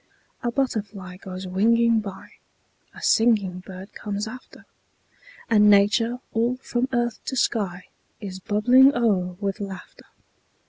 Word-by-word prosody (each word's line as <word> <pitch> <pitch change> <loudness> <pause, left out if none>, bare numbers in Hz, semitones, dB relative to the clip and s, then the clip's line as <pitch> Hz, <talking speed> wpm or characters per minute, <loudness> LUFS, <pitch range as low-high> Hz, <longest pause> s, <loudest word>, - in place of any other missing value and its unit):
A 240 - -1
butterfly 205 -8 -3
goes 185 0 -8
winging 230 +5 +3
by; 195 -3 -8 0.7
A - - -11
singing 210 -6 +2
bird 185 +2 -11
comes 205 +1 -4
after; 255 +4 -11 0.8
And 210 -2 +5
Nature, 210 +4 +4 0.2
all 235 +3 +1
from 250 -1 -2
earth 240 -2 -1
to 265 - -3
sky, 195 -7 -1 0.3
Is 190 -3 -7
bubbling 245 +7 +4
o'er 190 -7 0
with 200 0 -3
laughter. 195 -2 -9
210 Hz, 125 wpm, -24 LUFS, 190-235 Hz, 0.8 s, And